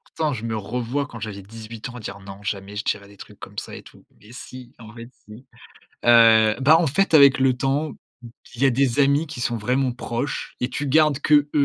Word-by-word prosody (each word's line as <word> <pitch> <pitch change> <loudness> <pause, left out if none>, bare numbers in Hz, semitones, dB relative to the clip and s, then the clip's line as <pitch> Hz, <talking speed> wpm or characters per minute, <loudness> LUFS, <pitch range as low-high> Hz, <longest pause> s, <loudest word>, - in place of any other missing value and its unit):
pourtant 155 -2 -1
je 115 -2 -6
me 110 -1 -3
revois 120 +6 -3
quand 115 - -10
j'avais 105 -2 -7
18 110 +3 -9
ans 125 - -9
dire: 105 -2 -8
«Non, 100 0 -10
jamais 100 0 -5
je 105 - -3
dirais 100 -1 -2
des 100 - -18
trucs - - -14
comme - - -12
ça - - -6
et - - -11
tout». - - -18 0.2
Mais 105 - -16
si, 125 0 -11
en 110 -1 -12
fait 115 0 -11 0.2
si. 110 +5 -13 0.6
Heu, 115 -2 +6
bah, 155 +5 +6
en 165 - +1
fait, 195 +7 0
avec 140 -3 +7
le 130 -1 +3
temps, 140 +4 -1 0.6
il 120 - -8
y 140 - +5
a - - +5
des 130 0 +1
amis 140 +3 +3
qui 145 -5 -8
sont 120 -1 -1
vraiment 125 +3 0
proches 120 +2 -4
et 125 - -2
tu 140 +3 -4
gardes 150 0 +3
qu'eux, 145 0 +3
125 Hz, 225 wpm, -22 LUFS, 110-140 Hz, 0.6 s, avec